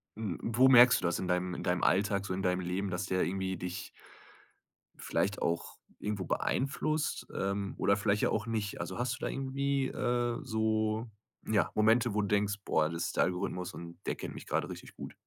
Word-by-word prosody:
w 105 -5 -3
wo 125 +3 +4
merkst 125 0 +8
du - - -2
das 85 0 +1
in 95 - -3
deinem 90 0 0
in - - -5
deinem 90 0 0
Alltag, 100 +1 +2
so 95 - -3
in 95 - -2
deinem 90 -1 +1
Leben, 90 +3 -2
dass 90 +2 -2
der 95 0 +1
irgendwie 95 0 -2
dich 90 +3 -5 1.1
vielleicht 100 +2 -1
auch 85 0 -2 0.2
irgendwo 105 -3 -3
beeinflusst, 150 - -1
ähm, 100 0 -1
oder 100 +1 +3
vielleicht 105 0 +1
ja - - +3
auch 110 - -1
nicht? 110 -3 -2
Also, 85 +2 -5
hast 125 0 0
du - - -13
da - - 0
irgendwie, 135 0 -1
äh, 120 -1 0
so, 110 +1 0 0.4
ja, 105 -6 +2
Momente, 110 +2 +4
wo 105 - +1
du 100 - -1
denkst: 100 0 +1
„Boah, 75 0 +2
das 85 0 -2
ist - - -6
der - - +5
Algorithmus 90 0 -3
und 85 +1 -9
der - - -1
kennt - - -7
mich - - -9
grade - - -1
richtig - - -9
gut?“ - - -8
100 Hz, 205 wpm, -31 LUFS, 90-115 Hz, 1.1 s, merkst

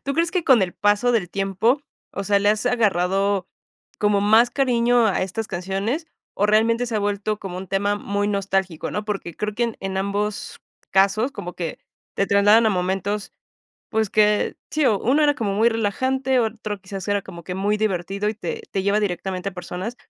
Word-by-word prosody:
¿Tú 275 - -2
crees 335 +2 +1
que 365 -3 -1
con 245 -7 +5
el 180 - -2
paso 205 +4 +2
del 210 -6 +1
tiempo, 195 +7 +1 0.3
o - - -4
sea, 200 0 +3
le 205 +1 +2
has 215 +3 -1
agarrado 195 -4 +1 0.5
como 205 -1 +2
más 220 +4 +5
cariño 240 -3 +3
a 195 - +1
estas 215 +4 -3
canciones 195 - -2 0.3
o 205 - +2
realmente 230 +3 +3
se 225 -2 -2
ha - - +2
vuelto 205 +1 -1
como 185 -3 -6
un 190 - -8
tema 200 +2 0
muy 205 0 -2
nostálgico?, 195 -4 -1
¿no? 210 - -3
Porque 195 -5 -4
creo 210 0 -3
que 240 +2 +1
en 230 -2 -3
en 195 0 -4
ambos 200 +2 -2 0.3
casos 200 +6 +3
como 180 0 -7
que 165 -3 -5 0.4
te 200 - +1
trasladan 205 +3 +5
a 220 - +4
momentos, 195 +2 -2 0.6
pues, 220 -2 0
que 210 -1 +2 0.2
sí, 305 -2 +1
o 210 -5 +3
uno 285 +6 +2
era 290 0 +4
como 210 -5 -1
muy 225 +4 +4
relajante, 260 +4 0
otro 215 -3 -3
quizás 195 0 -7
era 205 0 +1
como 170 -1 -10
que 180 +2 -5
muy 205 +2 0
divertido 200 0 -1
y 215 - -4
te 450 - -5
te 195 - -1
lleva 200 +1 +2
directamente 190 -1 -2
a - - -16
personas. 180 +6 -5
205 Hz, 195 wpm, -22 LUFS, 195-225 Hz, 0.6 s, con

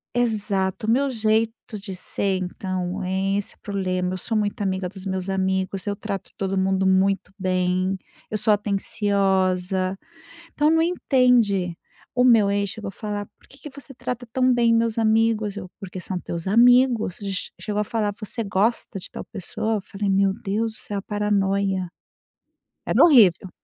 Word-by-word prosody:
Exato. 210 -4 0
O - - +1
meu 270 +3 +2
jeito 220 0 +1 0.3
de 195 -1 -7
ser, 190 +1 -1
então, 185 0 -3
é 190 +2 0
esse 205 - -3
o - - -31
problema, 185 -2 -2
eu - - -3
sou 225 +5 -3
muito 210 0 0
amiga 190 -2 -1
dos 190 0 -10
meus 190 0 -3
amigos, 190 0 -1
eu 205 0 -1
trato 200 -2 -5
todo 195 0 -2
mundo 190 0 +1
muito 190 +1 +2
bem, 185 0 0 0.4
eu - - -2
sou 215 +1 +2
atenciosa, 195 -2 +1 0.6
então 300 +1 +3
não 325 0 +4
entende. 245 - +2 0.4
O 250 0 +3
meu 215 -5 +5
ex 200 -1 0
chegou 215 -3 -6
a - - -8
falar: 205 0 -5
"Por - - -25
que 270 - -17
que 300 - -9
você 270 0 -9
trata 245 -1 -5
tão 255 -1 +3
bem 235 -1 +3
meus 230 -1 +1
amigos?", 220 -2 +2
eu: 185 -3 -7
"Porque 185 -2 -7
são 185 0 -3
teus 170 +1 -5
amigos", 240 -2 +4
ch 195 -3 -4
chegou 210 -1 -2
a - - +2
falar: 210 -2 -1
"Você 225 +2 -4
gosta 200 +1 0
de - - -7
tal - - -7
pessoa?", 220 +2 -3
eu 205 - -2
falei: 200 0 -3
"Meu 195 0 +3
Deus 220 +1 -2
do - - -10
céu, 200 -1 -4
paranoia", 200 -3 0 1.0
era - - +4
horrível. 205 - +6
200 Hz, 175 wpm, -23 LUFS, 190-225 Hz, 1.0 s, horrível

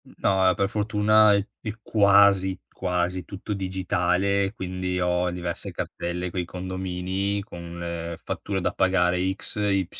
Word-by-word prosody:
N - - -17
no, 95 -1 +3
e 90 - +2
per 100 +2 +1
fortuna 105 0 +4
è 100 0 0 0.2
è 110 - -3
quasi 100 -3 +4
quasi 90 0 -2
tutto 100 +3 -6
digitale, 95 +1 0
quindi 90 0 -3
ho 90 0 +1
diverse 90 -1 -4
cartelle 90 +1 -4
coi 90 0 -2
condomini 95 +2 -3
con 85 -3 -9
le 85 -1 -4
fatture 100 -1 -3
da - - 0
pagare 90 0 +2
X, 105 - -7
Y, 100 -2 +1
95 Hz, 145 wpm, -25 LUFS, 90-100 Hz, 0.2 s, fortuna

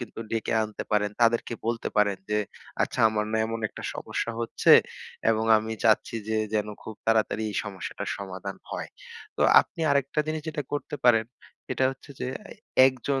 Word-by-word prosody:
কিন্তু 120 -1 -7
ডেকে 115 0 -1
আনতে 110 -1 -5
পারেন। 105 -1 +2
তাদেরকে 115 0 +3
বলতে 115 0 -1
পারেন 100 -2 +3
যে, 105 - +2 0.4
আচ্ছা, - - -2
আমার 105 -1 -1
না 110 - +2
এমন 115 0 -4
একটা - - -10
সমস্যা 115 - -3
হচ্ছে 115 - +3 0.6
এবং 110 0 +1
আমি 110 +1 -2
চাচ্ছি 110 0 +3
যে 110 0 +1 0.2
যেন 105 -1 +1 0.2
খুব 110 - -8
তাড়াতাড়ি 110 -1 +2
এই 100 - -5
সমস্যাটার 100 -3 -6
সমাধান 95 0 -6
হয়। - - -4 0.5
তো - - +1 0.2
আপনি - - -9
আরেকটা 140 +1 +1
জিনিস 155 -1 -2
যেটা 150 -1 -3
করতে 145 0 -3
পারেন, 115 -2 +5 0.4
সেটা 130 - 0
হচ্ছে 135 +2 -12
যে - - -2 0.6
১ 135 - +3 0.2
জন 135 -1 +2
110 Hz, 175 wpm, -27 LUFS, 105-125 Hz, 0.6 s, পারেন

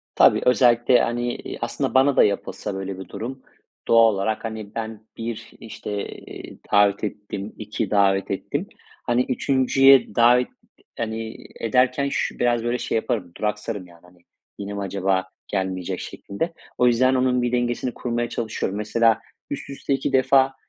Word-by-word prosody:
Tabii - - +6
özellikle, 120 0 +5
hani, 120 +1 -1
iii, - - -7
aslında - - -2
bana 135 +1 +4
da - - +7
yapılsa 100 0 -2
böyle 95 0 -5
bir 95 - -8
durum, 130 +3 -6 0.5
doğal 115 -2 +6
olarak, 105 +4 -2
hani, 110 -2 -6
ben 110 -1 -6
1, 115 -1 -5
işte, 110 -1 -7 0.2
eee, - - -10
davet 100 0 +4
ettim, 105 0 -5
2 105 -1 -3
davet 100 -1 +2
ettim. 95 - -3 0.4
Hani, 120 +1 +2
3'üncüye 135 -1 +4
davet, 120 +2 +5 0.5
hani, 110 0 -4 0.2
ederken 125 +4 +2
şü - - -2
biraz 120 -1 +1
böyle 120 +1 0
şey - - -2
yaparım, 105 -5 -2
duraksarım, 105 -2 -3
yani, 85 -1 -18
hani, 90 0 -21 0.4
"Yine 100 0 -5
mi 100 - -4
acaba 95 -1 0 0.2
gelmeyecek?" 95 -2 -2
şeklinde. 165 - -5 0.3
O 125 - +4
yüzden 130 +2 +4
onun 125 -1 +2
bir 120 0 0
dengesini 120 0 -1
kurmaya 120 -1 -2
çalışıyorum. 110 -4 -3
Mesela, 110 +1 +2 0.3
üst - - -5
üste 140 0 -2
2 135 - -2
defa, 135 0 +4
115 Hz, 155 wpm, -23 LUFS, 100-125 Hz, 0.5 s, da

